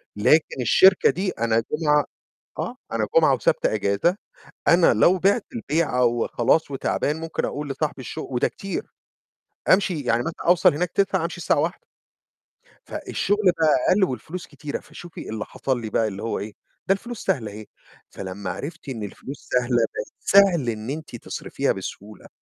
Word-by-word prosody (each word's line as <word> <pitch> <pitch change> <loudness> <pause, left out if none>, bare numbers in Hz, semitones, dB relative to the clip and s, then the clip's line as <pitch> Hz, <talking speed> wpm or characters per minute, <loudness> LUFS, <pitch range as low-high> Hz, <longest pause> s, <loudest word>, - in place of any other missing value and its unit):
لكن 135 +5 +3
الشركة 185 - +6
دي 190 +2 -1
أنا 115 0 0
جمعة 150 -1 +2 0.5
آه، - - -3 0.2
أنا - - 0
جمعة - - +6
وسبت - - 0
أجازة، 105 - +1 0.5
أنا 170 -6 +6
لو 170 - +4
بعت 200 +5 +2
البيعة 155 - +1
وخلاص 120 +5 +1
وتعبان 140 +2 -1
ممكن 165 0 -2
أقول 145 0 -4
لصاحب 145 +1 -2
الشُغ 155 +4 -6
وده 125 - +2
كتير، 195 - -5 0.9
أمشي 185 -4 +1
يعني 120 -2 +1
مثلًا 165 0 -6
أوصل 175 -3 +5
هناك 175 +4 -1
09:00 190 -3 +1
أمشي 170 +1 -4
الساعة 170 - +1
13:00. 165 +5 -1 1.1
فالشُّغل 205 -2 +1
بقى 155 -2 +4 0.2
أقل 200 +1 +3
والفلوس 175 +4 -3
كتيرة، 145 -2 -6
فشوفي 175 -1 -10
اللي 110 -1 -4
حصل 130 -3 -2
لي 110 - -5
بقى 110 +1 +1
اللي 100 -1 -6
هو 115 - -2
إيه؟ 105 +1 -6 0.3
ده 195 - +5
الفلوس 235 +3 -7
سهلة 110 -7 0
أهي، 105 +1 -9 0.4
فلما 95 0 -6
عرفت 160 - -6
إن 115 -5 -5
الفلوس 130 +7 -9
سهلة، 125 0 +2
بقى 115 -1 0 0.2
سهل 190 -10 +4
إن 110 +1 -4
إنتي 150 -3 -6
تصرفيها - - -2
بسهولة، 105 +1 -7
150 Hz, 160 wpm, -23 LUFS, 115-175 Hz, 1.1 s, الشركة